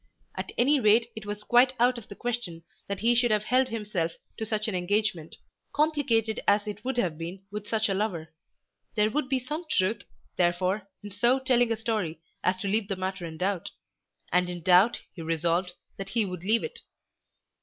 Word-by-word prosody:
At - - -5
any 280 +4 +4
rate 230 +1 +4
it 220 -1 -8
was 205 0 -5
quite 245 +3 +5
out 245 0 +3
of 220 - -14
the 200 - -9
question 225 -10 -4 0.2
that 200 -1 -4
he 235 +2 +4
should 240 0 +3
have 210 -1 +2
held 255 +4 +3
himself 205 -8 -2 0.2
to 220 - -4
such 215 -1 0
an 215 - -2
engagement, 180 -2 0 0.4
complicated 285 -8 +1
as 205 +1 +4
it 210 0 -6
would 260 -1 -2
have 170 -9 0
been 175 +4 -6
with 210 0 -6
such 220 0 +1
a 195 - 0
lover. 190 -6 -2 0.6
There 215 0 +3
would 290 +1 -1
be 265 - +2
some 300 +7 -4
truth, 205 -2 +1 0.4
therefore, 185 +3 +1
in 205 - -8
so 235 +7 +3
telling 250 -3 +2
the 225 - 0
story 215 -8 -2 0.2
as 185 0 +1
to 200 - -2
leave 205 +1 +1
the 195 - -2
matter 185 -1 -3
in 160 -1 -8
doubt, 185 +1 -1 0.6
and 180 0 +2
in 175 -1 -5
doubt 185 +6 +5
he 170 - -8
resolved 170 +3 0 0.2
that 195 0 -6
he 225 +1 +1
would 180 -3 -5
leave 220 +4 +2
it. - - -5
210 Hz, 195 wpm, -28 LUFS, 185-235 Hz, 0.6 s, quite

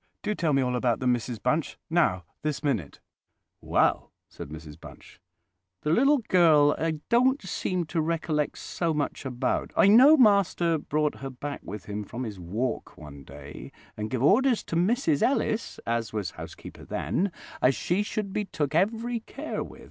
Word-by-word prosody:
Do 210 - 0
tell 165 -6 0
me 135 -1 +3
all 125 0 -1
about 125 -1 +1
them, 125 -1 +2
Mrs 120 -1 -4
Bunch—now, 155 - 0 0.2
this 150 0 -3
minute!" 115 - -2 0.6
"Well," - - +1 0.2
said - - -9
Mrs 75 0 -10
Bunch, - - -14 0.6
"the 150 - 0
little 275 - +4
girl 155 -5 +5
I 165 0 0 0.2
don't 255 +4 +4
seem 185 -1 -2
to 160 +1 -1
recollect 155 -2 -1
so 165 -3 -2
much 145 -1 -3
about. 125 0 -1
I - - +6
know 260 +9 +8
master 200 - +3
brought 150 +1 -1
her 135 - -5
back 140 +3 -6
with 105 -2 -8
him 105 0 -4
from 120 +5 -6
his 105 -5 -6
walk 105 +9 -3
one 70 -2 -11
day, 70 +1 -11 0.2
and 105 0 -4
give 130 +1 -2
orders 240 - +4
to - - -5
Mrs 170 -5 +2
Ellis, 230 -4 0
as 115 -1 -1
was 105 -5 -3
housekeeper - - -10
then, 195 +1 -1 0.3
as 130 +1 +4
she 180 +4 0
should 205 -1 -3
be 210 - -1
took 150 -6 -3
every 225 +7 +1
care 275 +7 -5
with. - - -12
150 Hz, 170 wpm, -27 LUFS, 120-195 Hz, 0.6 s, know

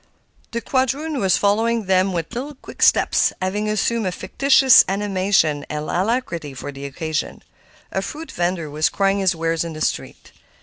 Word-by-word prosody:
The 235 - -4
quadroon 275 +4 -1
was 190 -3 +2
following 225 +2 +1
them 190 0 +2
with 165 -3 -4
little 280 +5 -5
quick - - -13
steps, - - +4
having 205 +3 -2
assumed 215 0 0
a - - -1
fictitious 270 +5 +5
animation 190 -6 +1
and 150 0 -4
alacrity 175 - -2
for 135 - -6
the 140 0 -8
occasion. 155 +3 -4 0.5
A - - -1
fruit 310 -1 -7
vender 175 -5 -2
was 150 +2 0
crying 195 0 +1
his 190 -2 +2
wares 165 0 -1
in 165 -1 -6
the 155 - -8
street. - - -3
190 Hz, 165 wpm, -21 LUFS, 165-230 Hz, 0.5 s, fictitious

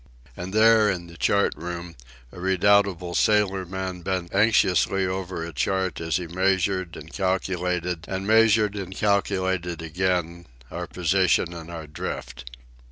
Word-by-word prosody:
And 90 +2 -6
there, 110 0 +5
in 90 -3 -2
the 85 0 -13
chart 100 +3 +2
room, 85 0 -7 0.4
a - - -11
redoubtable 95 -1 +2
sailorman 95 -3 0
bent 90 -1 -3
anxiously 95 -2 +3
over 95 -2 -3
a 85 - -8
chart 95 +4 -1
as 80 -1 -1
he 90 - -1
measured 95 0 0
and 80 +2 -11
calculated, 90 -2 -1
and 95 0 -4
measured 110 -1 +4
and 95 -2 -6
calculated 95 -4 0
again, 85 0 -2 0.2
our - - -5
position 90 -1 +1
and 85 -1 -9
our 85 -2 -7
drift. 75 -4 -6
95 Hz, 135 wpm, -24 LUFS, 85-95 Hz, 0.4 s, there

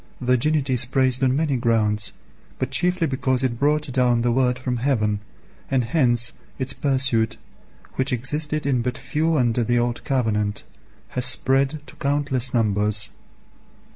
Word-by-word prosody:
Virginity 130 +2 +1
is 125 0 +2
praised 130 0 +1
on 130 0 +3
many 150 -2 +1
grounds, 105 -4 +1 0.5
but 130 0 -3
chiefly 175 +4 +2
because 130 -2 0
it 120 -3 -1
brought 150 0 +1
down 125 -2 +2
the 120 - +2
Word 125 0 +2
from 125 -1 -3
heaven, 110 -5 0 0.5
and 130 -2 +1
hence 120 -4 +3 0.2
its 130 0 -1
pursuit, 130 -5 0 0.6
which 130 +2 +1
existed 150 +5 -1
in 130 -4 +1
but 125 0 -3
few 160 +1 0
under 120 -2 +1
the 120 +2 +1
old 120 0 -1
covenant, 110 -6 0 0.5
has 125 -1 -1
spread 135 +3 +1
to - - -13
countless 140 -3 0
numbers. 105 -2 +1
130 Hz, 145 wpm, -23 LUFS, 120-140 Hz, 0.6 s, on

